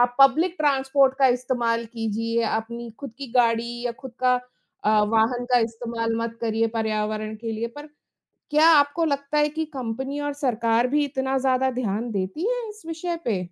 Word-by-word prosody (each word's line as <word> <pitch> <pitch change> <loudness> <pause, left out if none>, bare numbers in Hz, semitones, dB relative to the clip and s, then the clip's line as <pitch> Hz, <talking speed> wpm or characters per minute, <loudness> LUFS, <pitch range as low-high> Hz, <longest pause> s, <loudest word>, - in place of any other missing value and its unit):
आप 245 0 +3
public 315 +7 +5
transport 270 -2 +3
का 270 - +6
इस्तेमाल 245 -2 0
कीजिए, 230 +1 -1
अपनी 235 +1 -3
खुद 275 -5 -7
की 275 - -5
गाड़ी 235 0 +2
या 240 - -1
खुद 265 -3 -9
का 250 0 +4 0.5
अ, 215 0 +4
वाहन 225 +3 +1
का 245 - +7
इस्तेमाल 230 0 -2
मत 230 0 -3
करिए 225 0 +1
पर्यावरण 215 -1 -1
के 225 +1 -5
लिए। 225 +1 -2
पर 295 +1 -8 0.7
क्या 305 +2 +5
आपको 295 +2 +4
लगता 280 0 -1
है 295 0 +4
कि 320 +2 -3
कंपनी 265 +3 -4
और 290 0 -2
सरकार 235 -3 +1
भी 295 +3 +2
इतना 265 -1 -1
ज़्यादा 260 0 +2
ध्यान 235 -1 -2
देती 195 - -2
है - - -2
इस 420 -2 -11
विषय 335 +1 -3
पे? 215 -5 +1
245 Hz, 180 wpm, -24 LUFS, 230-280 Hz, 0.7 s, का